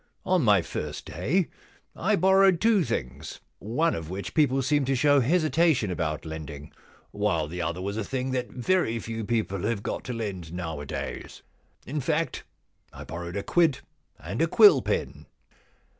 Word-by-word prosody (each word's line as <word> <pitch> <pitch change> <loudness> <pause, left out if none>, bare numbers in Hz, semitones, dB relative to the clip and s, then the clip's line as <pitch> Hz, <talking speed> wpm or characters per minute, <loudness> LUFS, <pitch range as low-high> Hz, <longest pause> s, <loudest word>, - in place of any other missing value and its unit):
On 185 -1 +3
my 100 -6 +4
first - - -5
day 140 - 0 0.5
I 205 +4 +1
borrowed 190 -2 +4
two 220 -3 +4
things 70 - -4
— - - -47
one 155 +11 0
of 80 -1 -5
which 95 +2 -5
people 135 -4 +2
seem 145 +2 +2
to 135 +1 +1
show 145 +2 +4
hesitation 155 - +2
about 80 -3 -2
lending, 75 -2 -7 0.4
while 100 -7 0
the 90 +3 -5
other 85 +2 -3
was 100 +2 -3
a 110 - -1
thing 130 +3 -3
that 125 -1 -2
very 125 -3 0
few 115 0 -5
people 105 -4 -1
have 105 0 -2
got - - -3
to 125 - -4
lend 95 -8 -5
nowadays. 80 -5 -6 0.4
In 145 +2 -3
fact, 160 +4 -1 0.5
I - - -9
borrowed 85 +3 -6
a 100 - -3
quid 160 -6 +2 0.4
and - - -4
a - - +3
quill 415 -1 +7
pen.' - - -3
115 Hz, 165 wpm, -26 LUFS, -, 0.5 s, quill